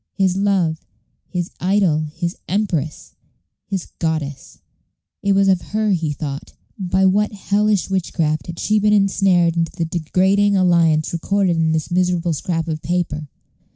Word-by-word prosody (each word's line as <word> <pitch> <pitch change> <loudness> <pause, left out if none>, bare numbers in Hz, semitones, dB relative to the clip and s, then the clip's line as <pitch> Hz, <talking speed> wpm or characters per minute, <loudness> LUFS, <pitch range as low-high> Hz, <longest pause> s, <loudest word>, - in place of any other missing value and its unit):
His 190 -2 +1
love, 190 -5 0 0.5
his 175 -2 -3
idol, 180 -5 +1
his 170 +1 -3
empress, 175 -7 -2 0.5
his 195 -4 -3
goddess 155 -5 -3 0.6
it 200 - +2
was 195 0 +3
of 185 -2 +3
her 215 0 -1
he 165 -5 0
thought. 145 -1 -6 0.3
By 190 0 +1
what 205 +3 +2
hellish 205 0 +1
witchcraft 165 -5 -1
had 170 -1 -7
she 215 +4 +1
been 210 0 +3
insnared 190 -4 +3
into 165 -1 -1
the 170 -2 -2
degrading 190 +5 +2
alliance 170 -4 +3
recorded 185 +1 +1
in 165 -1 +1
this 160 0 -2
miserable 180 -1 +1
scrap 165 +2 -2
of 155 -1 -3
paper? 165 -4 -2
180 Hz, 145 wpm, -20 LUFS, 160-195 Hz, 0.6 s, was